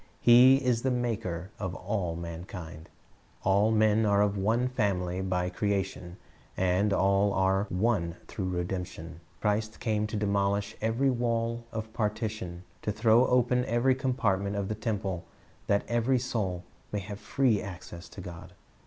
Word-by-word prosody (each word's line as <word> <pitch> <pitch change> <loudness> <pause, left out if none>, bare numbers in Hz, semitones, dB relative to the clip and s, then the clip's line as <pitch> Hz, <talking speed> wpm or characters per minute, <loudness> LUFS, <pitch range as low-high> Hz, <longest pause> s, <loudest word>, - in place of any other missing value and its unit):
He 125 +2 +8
is 125 -4 +1
the 130 - +1
Maker 105 -8 -2
of 95 -2 -3
all 90 -3 -2
mankind. 85 -1 -8 0.5
All 100 +3 +3
men 110 0 +3
are 100 -1 +4
of 105 -1 0
one 110 +6 +1
family 95 -7 -1
by 90 -1 -1
creation, 95 -2 -2 0.4
and 95 +3 +2
all 100 +1 +3
are 95 +1 +2
one 90 -4 0
through 95 -3 -3
redemption. 90 -2 -4 0.2
Christ 110 +1 0
came 105 -2 0
to 105 - -5
demolish 100 +1 0
every 115 +5 +2
wall 115 -1 -1
of 110 0 -5
partition, 105 -5 -3 0.2
to 105 - -1
throw 110 +3 +4
open 125 0 +3
every 120 +3 +3
compartment 105 -7 0
of 100 -1 -2
the - - 0
temple, 105 -4 -3 0.4
that 100 0 +2
every 120 +2 +2
soul 105 -8 -2 0.3
may 105 - -2
have 100 +1 -7
free 110 0 +1
access 90 -3 -9
to 95 - -9
God. 90 +1 -9
105 Hz, 145 wpm, -29 LUFS, 95-115 Hz, 0.5 s, He